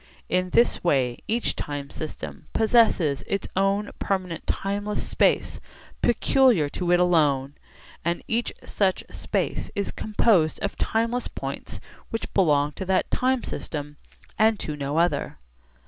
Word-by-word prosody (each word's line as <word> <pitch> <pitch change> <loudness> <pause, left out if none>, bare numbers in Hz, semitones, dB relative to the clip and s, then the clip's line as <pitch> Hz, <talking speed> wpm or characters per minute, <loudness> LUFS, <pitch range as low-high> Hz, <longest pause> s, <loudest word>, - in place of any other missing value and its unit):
In 185 0 +1
this 235 +6 +3
way 130 -8 +1
each 230 +2 0
time 145 -1 -5
system 155 - -7
possesses 215 - +3
its 200 - -1
own 195 +2 +1
permanent 185 -4 -2
timeless 205 +1 -2
space - - +1 0.4
peculiar 240 - +4
to 175 +3 -2
it 175 - +5
alone, 145 -6 +2 0.5
and 170 +1 -1
each 230 +1 0
such 190 -2 0
space - - -2
is 200 - -1
composed 205 -6 +2
of 200 - -2
timeless 230 +2 0
points - - -6 0.3
which 225 - -4
belong 150 -6 +3
to 190 - -6
that 190 0 +1
time 255 0 +1
system 145 -1 -5 0.4
and 220 0 +4
to 150 - -4
no 145 +1 -3
other. 170 +1 +1
185 Hz, 130 wpm, -25 LUFS, 150-215 Hz, 0.5 s, it